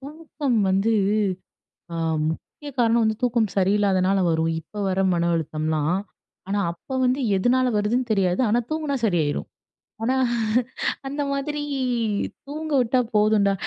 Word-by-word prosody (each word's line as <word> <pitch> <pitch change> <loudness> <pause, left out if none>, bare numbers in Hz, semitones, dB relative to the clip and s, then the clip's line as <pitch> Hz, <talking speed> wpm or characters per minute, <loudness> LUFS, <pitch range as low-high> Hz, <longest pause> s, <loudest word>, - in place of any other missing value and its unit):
தூக்கம் 290 -3 -3
வந்து 195 +4 +2 1.0
அ - - -3 0.3
முக்கிய 285 - -7
காரணம் 230 -1 +4
வந்து 220 0 +1
தூக்கம் 235 -3 +2
சரியில்லாதனால 195 -1 +2
வரும், 160 0 +1
இப்ப 205 +6 -8
வர 190 +1 0
மன 170 0 +1
அழுத்தம்லாம். 155 +2 -1 0.5
ஆனா 200 +1 0
அப்ப 260 +10 -6
வந்து 255 +2 +1 0.2
எதனால 250 +6 +2
வருதுன்னு 235 +4 0
தெரியாது. 190 -4 +1
ஆனா 235 +3 +3
தூங்குனா 310 -3 -1
சரியா 175 -7 +2
யிரும். - - -3 0.6
ஆனா, 255 +3 +1 0.9
அந்த 285 +2 -3
மாதிரி 295 +2 -2 0.9
தூங்க 310 +2 -5
விட்டா 250 +1 +2 0.2
போதும்டா. 210 -1 +4
215 Hz, 125 wpm, -24 LUFS, 185-260 Hz, 1.0 s, காரணம்